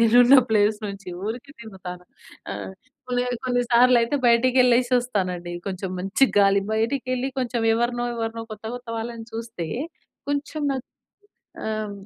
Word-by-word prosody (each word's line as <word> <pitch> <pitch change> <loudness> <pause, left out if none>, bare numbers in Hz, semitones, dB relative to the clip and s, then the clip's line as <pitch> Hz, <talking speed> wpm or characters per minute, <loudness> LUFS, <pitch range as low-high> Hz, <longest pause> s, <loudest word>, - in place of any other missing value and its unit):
నేను 230 +1 +5
ఉన్న 255 +3 +8
ప్లేస్ 210 0 +3
నుంచి 200 -1 -7 0.2
ఊరికే 240 +6 -5
తిరుగుతాను. 185 -5 -9 0.5
ఆహ్, - - -6 0.4
కొన్ని 245 0 0 0.2
కొన్ని 245 -1 +1
సార్లు 245 +1 +6
అయితే 235 +5 0
బయటికి 245 +2 +4
యె‌ళ్ళేసి 250 0 +4
వస్తానండి. 185 -8 -2
కొంచెం 190 -1 -4
మంచి 195 +8 +3
గాలి 200 0 +5
బయటికెళ్ళి 255 +3 -1
కొంచెం 240 -2 -1
ఎవరినో 240 +1 0
ఎవరినో 230 0 -3
కొత్త 215 +1 -11
కొత్త 245 -1 -13
వాళ్ళని 225 0 -6
చూస్తే, 225 -6 -5 0.6
కొంచెం 290 +1 -2
నాక్ 260 -2 -5 0.8
ఆహ్, 215 -1 -3
230 Hz, 140 wpm, -24 LUFS, 205-245 Hz, 0.8 s, ఉన్న